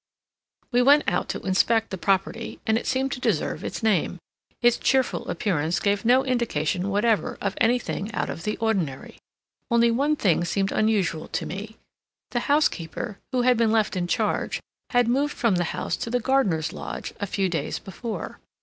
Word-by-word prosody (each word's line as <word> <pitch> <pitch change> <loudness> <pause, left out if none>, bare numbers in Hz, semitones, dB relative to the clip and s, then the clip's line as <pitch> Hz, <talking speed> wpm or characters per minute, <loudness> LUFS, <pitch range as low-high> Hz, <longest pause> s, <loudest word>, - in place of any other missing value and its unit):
We 245 0 +4
went 285 +4 +6
out 180 - 0
to - - -3
inspect 225 +4 +2
the 190 - -3
property, 195 +5 -1
and 220 -2 +2
it 225 - -2
seemed 265 +1 0
to 255 - -3
deserve - - -1
its - - -5
name. 195 -5 +1 0.4
Its 240 -1 +4
cheerful 265 -1 +1
appearance 170 -5 0
gave 205 +1 0
no 255 +3 +5
indication 195 - 0
whatever 210 +2 +1
of 200 -1 -1
anything 230 -3 +1
out - - -1
of - - -5
the 210 +4 -2
ordinary. 190 -12 -2 0.5
Only 235 -1 +4
one 285 +6 +2
thing 175 - +2
seemed 195 +3 0
unusual 200 -7 +1
to - - -3
me: 210 +5 -7 0.5
the 240 - 0
housekeeper, 200 - 0
who 255 -2 +1
had 250 -1 +4
been 225 -1 +3
left 220 -2 +2
in 175 -1 -1
charge, - - 0 0.3
had 245 -2 +3
moved 280 +5 +1
from 225 -7 +2
the 175 - +1
house 170 - -2
to - - -4
the 245 +1 +1
gardener's 215 - +1
lodge, - - -6
a 205 - -2
few 195 0 0
days 170 -3 -2
before. 220 +4 -6
220 Hz, 175 wpm, -25 LUFS, 190-245 Hz, 0.5 s, went